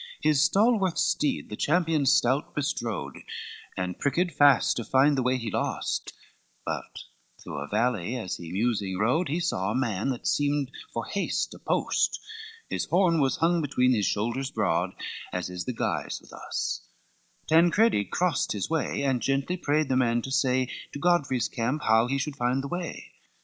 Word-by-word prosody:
XXVII 155 - +3
His 140 -2 +3
stalwart 200 -1 +3
steed 150 - 0
the - - -3
champion 160 0 +1
stout 135 -1 +2
bestrode 120 - -3 0.6
And 90 -1 -3
pricked 170 +6 +1
fast 145 -4 +5
to 120 - -2
find 135 +5 +4
the 130 - +1
way 130 +1 +1
he 115 -4 -4
lost, - - -2 0.5
But - - -4 0.5
through - - -6
a 75 - -5
valley 115 +1 0
as 110 -7 -4
he 85 -1 -8
musing 100 -2 0
rode, 130 - +1
He 160 +5 0
saw 100 - -1
a 110 - -1
man 115 -3 0
that 125 -3 -4
seemed 145 -2 +1 0.2
for 115 - -3
haste 200 - -2
a - - -12
post, - - 0 0.5
His - - -2
horn 175 -3 +3
was 135 -1 +2
hung 170 +1 +2
between 130 -3 +2
his 105 -5 +1
shoulders 120 +6 -1
broad, - - 0 0.4
As 90 0 -3
is 90 0 -5
the 130 - -2
guise - - -2
with - - -17
us: - - -3 0.6
Tancredi 170 - +4
crossed 175 - 0
His 105 - -3
way, 160 -3 0
and 130 -3 +1
gently 135 +8 0
prayed 155 -3 +1
the 130 - +1
man 120 -2 +2
to 135 - -5
say, 130 -1 +2 0.3
To 145 - -5
Godfrey's 140 -7 +2
camp 125 +6 -2
how 110 +1 +4
he 135 +2 0
should 140 0 -3
find 125 +2 0
the - - -4
way. 175 +2 -5
135 Hz, 175 wpm, -27 LUFS, 115-155 Hz, 0.6 s, fast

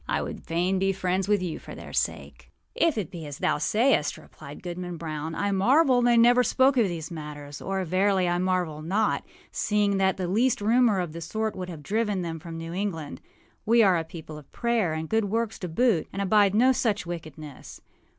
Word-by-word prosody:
I - - 0
would - - -7
fain 180 +3 0
be 195 0 +1
friends 185 0 -1
with 205 -3 +2
you 170 -3 -4
for - - -10
their - - -10
sake.â - - -4
âIf 330 -7 +2
it 195 -7 -3
be 165 -4 -7
as 145 -1 -7
thou - - 0
sayest,â 220 - +1
replied 145 +1 -12
Goodman 180 0 -5
Brown, 160 -1 -5
âI 200 0 0
marvel 255 +5 +4
they 240 -1 +4
never 245 +2 +6
spoke 260 +2 +3
of 235 -5 +3
these 170 -1 -5
matters; 150 -3 -8
or, 195 -1 -2
verily, 185 +1 +2
I 175 0 +1
marvel 180 -4 -1
not, 200 +7 0 0.3
seeing 205 -2 +1
that 190 0 +2
the 185 -2 -2
least 230 +7 +2
rumor 225 -1 +3
of 175 -4 -3
the 170 - -7
sort 220 +6 -3
would 185 -1 -5
have 160 -4 -8
driven 210 0 -1
them 165 -1 -4
from 165 +1 -8
New 165 +1 -6
England. 175 -6 -4 0.4
We 230 +1 +4
are 185 -4 +4
a - - -3
people 160 -2 -9
of 145 - -18
prayer, 235 -8 0
and 160 0 -4
good 220 +2 +1
works 225 +2 -2
to 180 - -4
boot, 190 0 +1
and 195 - -6
abide 200 0 +3
no 250 +4 +5
such 220 -6 0
wickedness. 155 -4 -8
185 Hz, 210 wpm, -26 LUFS, 165-215 Hz, 0.4 s, never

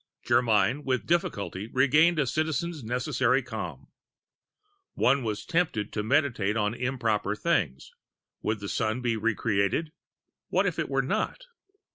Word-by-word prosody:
Germyn 115 +3 +3
with 130 -5 -1
difficulty 105 - -1
retained 150 +8 +4
a 150 - +2
Citizen's 155 +3 -2
necessary 125 +2 +1
calm. 110 -3 -6 1.1
One 135 +1 +3
was 110 -2 -3
tempted 160 - 0
to 105 - -1
meditate 115 -4 +1
on 105 0 +1
improper 115 -5 -1
things: 105 - -1 0.5
Would 110 -1 -2
the 100 - -5
Sun 110 +3 -1
be 120 -2 0
re 110 0 0
created? 110 +9 0 0.6
What - - +1
if - - -1
it - - -1
were - - +1
not? - - -2
120 Hz, 135 wpm, -27 LUFS, 105-140 Hz, 1.1 s, retained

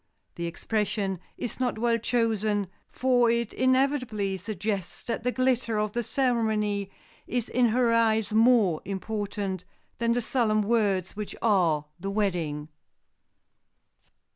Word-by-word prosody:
The 170 0 -4
expression 195 +1 -2 0.2
is 245 - -5
not 250 -3 0
well 230 0 +1
chosen, 220 -3 +1 0.2
for 250 -2 +3
it 235 -1 0
inevitably 255 -6 +1
suggests 200 -1 -4
that 235 -1 -3
the 250 - +1
glitter 255 -3 +1
of 210 0 0
the 240 - -1
ceremony 220 -5 0 0.4
is 245 -2 -1
in 245 0 +3
her 235 +1 +2
eyes 225 -2 +2
more 220 -7 +4
important 200 -2 -3 0.4
than 235 0 +2
the 245 - 0
solemn 215 -3 +1
words 200 -5 +1
which 210 -1 -5
are 175 -9 +3
the 195 +3 -4
wedding. 170 -8 -1
220 Hz, 125 wpm, -27 LUFS, 200-235 Hz, 0.4 s, more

